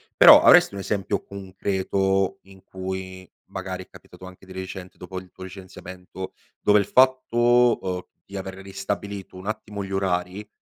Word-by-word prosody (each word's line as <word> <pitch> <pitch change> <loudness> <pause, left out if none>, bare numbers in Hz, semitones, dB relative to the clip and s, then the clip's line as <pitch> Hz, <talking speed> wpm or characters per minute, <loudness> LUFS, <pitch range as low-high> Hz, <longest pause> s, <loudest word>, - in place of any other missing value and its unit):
Però - - +9
avresti - - +7
un 100 - -5
esempio 100 -1 -2
concreto 95 0 -1
in 95 0 -17
cui 95 0 -6 0.2
magari - - -6
è - - -37
capitato 95 - -14
anche 95 +1 -13
di 95 - -15
recente 95 0 -8
dopo 95 +1 -8
il 90 -1 -16
tuo - - -11
licenziamento, 95 0 -9 0.3
dove 105 - +4
il 100 - 0
fatto, 125 -1 +4
uhm, 90 -1 -2 0.2
di 100 - -8
aver 95 0 -6
ristabilito 95 0 -5
un 95 +2 -9
attimo 105 -2 -4
gli 95 - -8
orari, 95 +1 -2
95 Hz, 160 wpm, -24 LUFS, 95-100 Hz, 0.3 s, Però